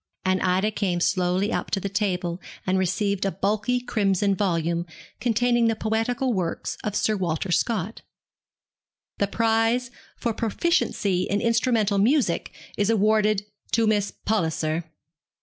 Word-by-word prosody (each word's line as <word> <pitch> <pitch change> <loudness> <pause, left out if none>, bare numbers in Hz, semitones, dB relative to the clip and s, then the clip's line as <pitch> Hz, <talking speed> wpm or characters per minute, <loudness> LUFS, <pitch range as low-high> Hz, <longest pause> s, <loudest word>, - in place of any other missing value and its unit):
and 185 0 +2
Ida 190 +3 +2
came 190 -4 -1
slowly 185 +4 +1
up - - -2
to 195 - 0
the 200 - -3
table 185 -3 -1 0.2
and 190 0 +1
received 190 +1 0
a 195 - +2
bulky 210 +6 0
crimson 200 -5 +1
volume, 170 -3 0 0.3
containing 240 0 +2
the 225 - +1
poetical 225 +4 0
works 180 -5 -2
of 210 -1 -3
Sir 215 - +1
Walter 180 -1 -2
Scott. 210 +2 0 1.2
'The 200 - +2
prize 225 +3 +1 0.3
for 235 -2 -1
proficiency 210 - 0
in 205 - +1
instrumental 230 -3 +2
music 235 - +2 0.3
is 205 +1 +2
awarded 215 -1 +3 0.3
to 230 -1 +3
Miss 210 -2 +2 0.2
Palliser!' 165 -5 0
205 Hz, 130 wpm, -25 LUFS, 185-225 Hz, 1.2 s, awarded